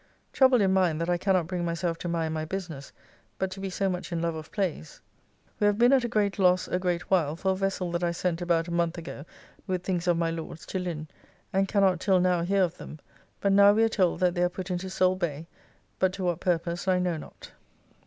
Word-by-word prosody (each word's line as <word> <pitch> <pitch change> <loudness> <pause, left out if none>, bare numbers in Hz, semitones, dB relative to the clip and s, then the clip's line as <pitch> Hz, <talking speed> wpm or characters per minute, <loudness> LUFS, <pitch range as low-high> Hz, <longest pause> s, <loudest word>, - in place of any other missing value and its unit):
Troubled 260 -3 +5
in 190 -1 +2
mind 180 -5 +2
that 165 +1 -1
I 175 - +1
cannot 185 -3 +2
bring 175 +1 -3
myself 170 0 -2
to - - -5
mind 165 -2 -1
my 155 -1 -2
business, 160 -5 -6 0.5
but 190 0 -2
to 195 - -7
be 195 0 -4
so 195 +1 -1
much 180 -1 -4
in 170 - -1
love 170 0 -1
of 155 -1 -8
plays. 180 - -3 0.6
We 205 - +3
have 205 0 +2
been 240 +3 +5
at 265 -2 +4
a - - 0
great 210 -4 0
loss 185 -1 +3
a 180 - -1
great 180 0 -2
while 160 -5 +2
for 190 +3 0
a - - 0
vessel 190 -2 -2
that 170 +1 -2
I 175 - +2
sent 170 0 -2
about 170 -1 +1
a - - -6
month 170 0 0
ago 165 -3 -8 0.4
with, 185 -2 -2
things 180 -2 -2
of 175 -1 +3
my 165 -1 0
Lord's 165 0 -7
to 190 - -3
Lynn, 165 -4 -4 0.5
and 195 +1 +2
cannot 195 -3 +2
till 190 0 +3
now 180 -1 +2
hear 195 +3 +2
of 180 -1 -2
them, - - -9 0.4
but 200 - +2
now 200 +1 +7
we 220 +2 +3
are 225 - +3
told 185 -4 +1
that 180 -1 +3
they 175 - -1
are 180 - +3
put 185 +1 -6
into 180 +1 -3
Soale 185 0 +2
Bay, 160 -3 -3 0.5
but 185 -1 +2
to 190 - -5
what 175 -2 0
purpose 175 0 -1
I 185 -1 +3
know 180 -2 0
not. 150 - -12
180 Hz, 245 wpm, -27 LUFS, 170-190 Hz, 0.6 s, now